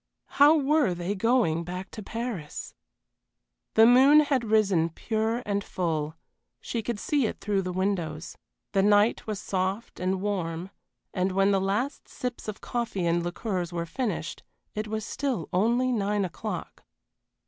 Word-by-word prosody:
How 300 +3 +8
were 290 - +2
they 175 +3 -2
going 205 -6 +2
back 180 +2 -6
to 215 - -7
Paris? 220 -8 -5 1.0
The 225 - +8
moon 265 +5 +7
had 280 -4 +1
risen 195 -7 +3
pure 220 +6 -1
and 200 -1 -1
full, 160 -5 -2 0.4
she 230 - -3
could 235 0 -3
see 280 -2 +1
it - - -6
through 205 -2 0
the 185 -1 -3
windows. 175 -4 -2 0.4
The 195 - +3
night 205 +3 +3
was 210 -3 -3
soft 190 +2 -2
and 185 +1 0
warm, 185 -3 -3 0.4
and 185 0 0
when 195 +1 +3
the 195 -1 +2
last 210 +9 -1
sips 250 -3 -5
of 215 0 -5
coffee 230 -7 -2
and 170 0 +2
liqueurs 175 0 -3
were 170 -1 -2
finished 195 -2 -3 0.3
it 215 +1 -3
was 215 0 -3
still 255 - -2
only 235 +7 +2
nine 205 -3 +1
o'clock. 175 - -6
205 Hz, 150 wpm, -27 LUFS, 180-235 Hz, 1.0 s, How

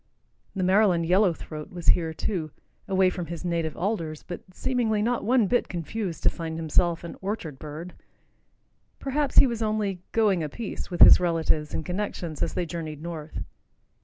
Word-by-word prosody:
The 190 - -1
Maryland 185 -2 +4
yellow 185 +2 +4
throat 155 +1 -8
was 175 -2 -3
here, 165 -2 +4
too, 160 -1 -3 0.4
away 190 -1 +3
from 175 -2 -5
his 170 +2 -6
native 165 -3 -1
alders, 170 -6 -2
but 175 - -7
seemingly 225 0 0
not 240 +1 0
one 240 0 +3
bit 245 +5 +1
confused 175 0 -4
to - - +5
find 165 -2 -5
himself 165 +1 +1
an 170 - -7
orchard 190 -8 -4
bird. 155 +4 -7 1.0
Perhaps 280 +1 -2
he - - +10
was 235 -3 -2
only 210 -4 -1
"going 205 -6 +3
a 155 - -2
piece" 225 +6 -6
with 175 -2 -4
his - - +10
relatives 165 -3 0
and - - -3
connections 180 -4 -4
as - - -1
they 180 - 0
journeyed 160 -3 -5
north. 160 -2 -6
180 Hz, 170 wpm, -26 LUFS, 165-210 Hz, 1.0 s, he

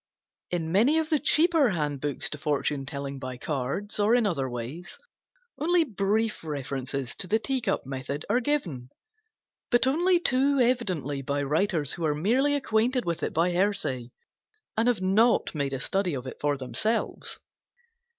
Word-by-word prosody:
In 165 -2 -2
many 235 - +4
of 320 0 -1
the 305 - +4
cheaper 315 -2 +4
handbooks 145 -5 -2
to 150 - -6
Fortune 145 -1 -1
telling 140 -1 -5
by 130 -1 -6
Cards 150 - -3
or 210 +3 +4
in 240 -2 +3
other 140 -10 0
ways 125 +9 -6 0.6
only 340 +2 +3
brief 215 - -1
references 135 -3 -4
to 185 - -4
the 215 - +3
Tea 260 +3 -2
cup - - -1
method 135 +2 -5
are 235 +5 +2
given; 185 - -2 0.8
but 240 0 +3
only 345 +7 +3
too 275 -2 +2
evidently 185 - 0
by 140 +1 -1
writers 155 0 +1
who 170 - -3
are 150 -1 +1
merely 255 - +2
acquainted 245 -1 +1
with 170 -1 -2
it - - -1
by 170 +3 +2
hearsay 175 - 0 0.7
and 225 +2 +2
have 240 -6 +2
not 220 +5 +3
made 140 -3 -1
a 135 - -3
study 190 +1 0
of 130 -1 -5
it 130 - -7
for 145 -1 +1
themselves. 215 - -2
180 Hz, 160 wpm, -27 LUFS, -, 0.8 s, many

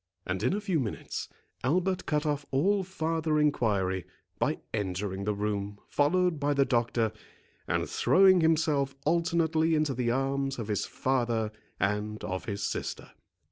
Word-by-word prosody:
And 90 0 -2
in - - +2
a - - -1
few 190 -6 0
minutes, 115 -6 -4 0.3
Albert 180 +7 +1
cut 150 0 +1
off 145 -1 0
all 195 +9 +2
farther 160 -3 -1
enquiry, 100 - +1 0.3
by - - +1 0.2
entering 100 -1 -2
the 105 0 0
room, 100 0 -2
followed 175 +2 +2
by 145 0 +1
the 140 0 +4
doctor, 120 -3 +1 0.6
and - - 0
throwing 190 -1 +5
himself 155 -4 +2
alternately 165 -1 +2
into 150 -2 +1
the 125 -1 -1
arms 135 +2 0
of 115 -3 -5
his 105 - 0
father 120 -4 0 0.3
and 105 +2 -1
of 95 0 -3
his 100 -2 -3
sister. - - -4
135 Hz, 145 wpm, -29 LUFS, 105-160 Hz, 0.6 s, throwing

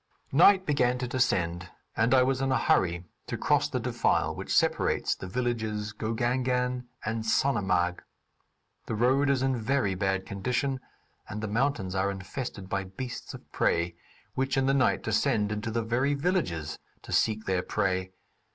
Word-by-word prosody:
Night 185 +6 +6
began 125 -4 +2
to 125 0 -3
descend, 95 -9 0 0.3
and 115 +4 +3
I 130 - +6
was 130 0 0
in 135 0 +1
a 130 - +3
hurry 85 0 +1 0.2
to - - -3
cross 145 0 +2
the 130 - -1
defile 120 -1 +1
which - - -6
separates - - +2
the 95 - -8
villages 110 -1 -2
Gogangan 125 +3 -1 0.2
and 110 +1 -2
Sonamarg. 95 -8 +1 0.9
The 110 - -2
road 130 +5 +3
is 135 -2 +2
in 135 -1 +2
very 115 -3 0
bad 95 0 -1
condition, 125 +6 -1 0.5
and 105 - -5
the 110 - -3
mountains 110 -4 0
are 95 +1 +1
infested 100 +1 -6
by 95 0 -2
beasts 120 +7 -7
of - - -15
prey 85 +1 +1 0.4
which 135 +1 -1
in 135 - +3
the 135 - +3
night 135 -2 +2
descend 105 -1 +1
into 105 +1 -3
the 115 +1 -1
very 130 +6 +1
villages 140 - -1 0.2
to - - -10
seek 110 -1 +1
their 95 -1 +1
prey. 95 -2 -1
115 Hz, 160 wpm, -28 LUFS, 95-130 Hz, 0.9 s, Night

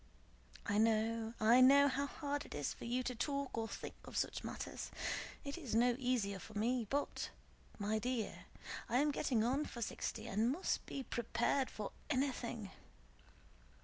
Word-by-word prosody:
I 205 -1 +2
know, 225 +1 +2
I 230 +4 +7
know 280 +2 +8
how 280 +1 0
hard 290 -1 -2
it - - -7
is 145 -1 -1
for - - -9
you 250 +2 0
to 250 - -1
talk 280 +2 -1
or 225 -1 -1
think - - -6
of - - -6
such - - 0
matters. - - -5 0.6
It 280 +4 -4
is 260 -9 -3
no 240 +1 +5
easier 235 -7 +1
for - - -11
me; 235 +1 +1
but, 285 +1 -1 0.5
my 215 +1 0
dear, 245 -1 -2 0.4
I 245 - +3
am 295 +2 +4
getting 255 -6 +1
on 265 +6 +2
for 235 - -4
sixty - - -3
and 220 +5 +2
must 335 +7 0
be 275 - -4
prepared 240 +3 +1
for 210 -2 -5 0.2
anything. 250 -6 -1
245 Hz, 165 wpm, -38 LUFS, 220-275 Hz, 0.6 s, know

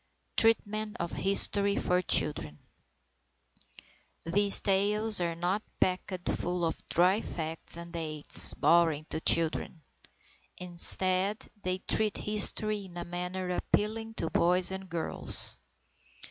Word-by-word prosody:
TREATMENT 215 -1 0
OF 170 0 -5
HISTORY 200 +1 +1
FOR 180 -2 -1
CHILDREN 145 - +2 1.7
These 200 +4 +5
tales 205 +1 +3
are 170 -1 -3
not 180 +5 -3 0.2
packed 185 0 -3
full 175 0 -2
of 165 - -5
dry 185 +5 +1
facts 160 0 -6
and 170 0 -11
dates, 155 -3 +1
boring 165 -3 +1
to 155 - -4
children. 160 -1 +3 0.7
Instead, 185 +3 +3
they 185 -1 -3
treat 210 +2 +1
history 210 0 -1
in 175 -2 -13
a 175 - -6
manner 180 +1 -6
appealing 220 +4 -3
to - - -5
boys 180 +1 +2
and 190 0 -8
girls. 165 -1 -6
185 Hz, 115 wpm, -28 LUFS, 170-205 Hz, 1.7 s, These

